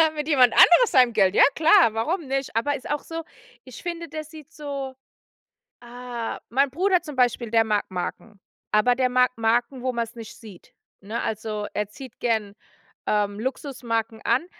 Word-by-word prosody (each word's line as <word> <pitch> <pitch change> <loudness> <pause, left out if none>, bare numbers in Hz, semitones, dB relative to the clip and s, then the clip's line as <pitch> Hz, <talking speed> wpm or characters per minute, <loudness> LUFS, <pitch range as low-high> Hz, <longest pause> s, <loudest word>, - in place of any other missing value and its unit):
Mit 300 -1 -4
jemand 255 -5 +5
anderes 450 +7 +6
seinem 250 -3 +5
Geld, 195 -3 +3
ja, - - +7
klar, 325 - +5
warum 315 +10 -2
nicht. 270 -3 -3
Aber 285 +6 +1
ist 265 - -9
auch 295 0 -2
so 330 0 -6 0.4
ich 255 -3 -12
finde, 340 -1 -5
der 310 0 -5
sieht 310 0 -14
so 280 -3 -6 0.9
Ah, 240 -1 -6
mein 275 +3 +2
Bruder 365 +4 +2
zum 300 -4 -8
Beispiel, 245 -2 +1
der 225 -1 +4
mag 210 -2 0
Marken, 195 +3 -6 0.3
aber 245 +4 +3
der 255 0 +1
mag 250 0 +3
Marken, 240 +3 0
wo 255 - 0
man 235 - 0
es 230 - -17
nicht 230 -2 -10
sieht, 210 -7 -14 0.3
ne? 215 +4 -4
Also, 215 -1 -4
er 210 -1 -2
zieht 260 +1 -12
gern, 220 -4 -1 0.5
ähm, 205 -1 0
Luxusmarken 230 -3 -3
an, 245 +8 +1
245 Hz, 175 wpm, -24 LUFS, 225-285 Hz, 0.9 s, ja